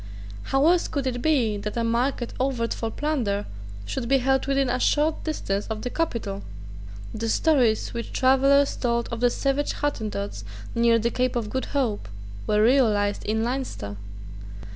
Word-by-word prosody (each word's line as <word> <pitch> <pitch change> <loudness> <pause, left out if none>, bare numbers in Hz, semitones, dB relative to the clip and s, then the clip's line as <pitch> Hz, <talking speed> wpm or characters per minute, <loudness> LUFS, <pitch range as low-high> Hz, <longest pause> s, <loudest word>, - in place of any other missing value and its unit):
How 270 +2 +2
else 345 +1 +4
could 280 -3 -3
it 245 -2 -2
be 245 -9 +2
that 210 +2 -5
a 230 - +1
market 240 +2 0
overt 250 -3 0
for 225 - -3
plunder 230 -8 -1 0.4
should 245 - -3
be 270 - +5
held 265 +1 +1
within 275 -1 +2
a 250 +1 0
short 300 +4 +1
distance 205 -10 -2
of 220 -1 -4
the 250 - -3
capital? 225 -11 -2 0.7
The 225 +1 -3
stories 250 -5 +2
which 235 0 -5
travellers 275 +2 +4
told 235 -1 -1
of 235 - -3
the 245 0 +4
savage 275 +3 0
Hottentots 210 - -3 0.3
near 235 0 +4
the 230 +1 0
Cape 255 +1 0
of 220 -3 -2
Good 260 - -2
Hope 240 - -1 0.4
were 210 0 +3
realised 215 -5 +3
in 220 +1 0
Leinster. 240 - -3
245 Hz, 165 wpm, -25 LUFS, 220-275 Hz, 0.7 s, be